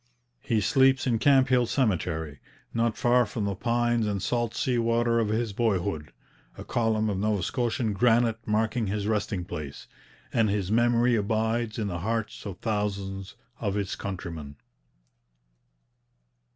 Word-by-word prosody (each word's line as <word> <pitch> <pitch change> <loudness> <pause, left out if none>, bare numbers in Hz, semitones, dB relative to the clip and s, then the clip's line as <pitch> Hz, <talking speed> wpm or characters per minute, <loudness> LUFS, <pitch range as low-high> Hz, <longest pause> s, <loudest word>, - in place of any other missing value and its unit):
He 115 -4 0
sleeps 135 +5 +3
in 120 -3 +1
Camphill 130 -3 +4
Cemetery, 80 - -1 0.3
not 115 -1 0
far 125 -1 +4
from 105 0 -3
the 100 - -1
pines 120 +2 +1
and 100 -1 -1
salt 120 +3 -1
sea 125 -4 0
water 115 0 +2
of 115 - +1
his 110 0 -1
boyhood, 95 -8 -1 0.5
a - - -7
column 110 -2 0
of 100 -3 -1
Nova 105 -2 0
Scotian 120 0 -1
granite 115 +1 +3
marking 110 +1 0
his 100 +1 -2
resting 105 -4 -1
place; 75 -5 -7 0.5
and 115 -2 +3
his 100 -1 -1
memory 120 +1 +3
abides 110 +1 0
in 110 - -1
the 85 -3 -3
hearts 110 +2 -3
of 95 -3 -6
thousands 100 -2 -3 0.2
of 100 -3 -1
his 100 -2 -2
countrymen. 85 -7 -6
110 Hz, 140 wpm, -27 LUFS, 100-120 Hz, 0.5 s, Camphill